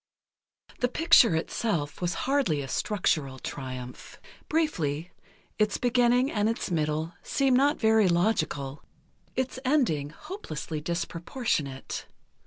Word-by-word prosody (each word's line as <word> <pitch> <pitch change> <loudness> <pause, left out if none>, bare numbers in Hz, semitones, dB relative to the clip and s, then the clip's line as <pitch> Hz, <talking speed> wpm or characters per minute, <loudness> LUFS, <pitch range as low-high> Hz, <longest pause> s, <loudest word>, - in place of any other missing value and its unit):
The 245 - +2
picture 250 - +5
itself 160 -2 -2
was 175 0 0
hardly 260 - +1
a - - -6
structural 150 -6 0
triumph. 130 -2 -7 0.3
Briefly, 175 - 0 0.5
its 210 -1 +2
beginning 245 +2 +3
and 210 0 +1
its 225 -4 -3
middle 155 0 -1
seem 270 -2 +2
not 285 +4 +3
very 220 -2 +4
logical, 170 -7 0 0.5
its 260 0 -2
ending 245 - +1
hopelessly 155 - -6
disproportionate. 170 - -3
180 Hz, 105 wpm, -28 LUFS, 150-250 Hz, 0.5 s, picture